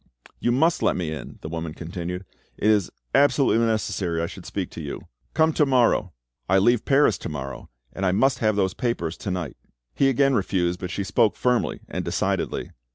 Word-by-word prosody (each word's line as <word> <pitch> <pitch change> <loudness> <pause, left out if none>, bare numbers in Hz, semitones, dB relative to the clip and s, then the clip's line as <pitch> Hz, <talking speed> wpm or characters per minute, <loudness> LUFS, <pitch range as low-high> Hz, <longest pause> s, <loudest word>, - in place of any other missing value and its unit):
"You 120 - +1
must 160 +7 +2
let - - +2
me 85 -3 -2
in," 80 - -7
the - - -4
woman 80 -1 -5
continued; 90 +2 -5 0.3
"it 110 - +3
is 105 -4 +2 0.2
absolutely 140 -5 +4
necessary 105 -6 0
I 85 - 0
should - - -9
speak - - -4
to - - -7
you." - - -5 0.3
"Come 160 0 +4
to 150 - +3
morrow." 120 -7 +3 0.4
"I 95 - +5
leave 120 +4 +3
Paris 135 -9 +4
to - - -5
morrow, 70 -4 -6 0.2
and 95 - -5
I 90 - +3
must 130 +8 +2
have 110 -2 +2
those 95 -2 +1
papers 90 -10 -2
to - - -5
night." 90 -7 -3 0.4
He 135 - +3
again 135 +1 +3
refused, 90 -5 0
but 90 - -4
she 100 +2 -2
spoke 105 +3 +2
firmly 125 -1 0
and - - -4
decidedly. - - -1
100 Hz, 195 wpm, -24 LUFS, 85-120 Hz, 0.4 s, I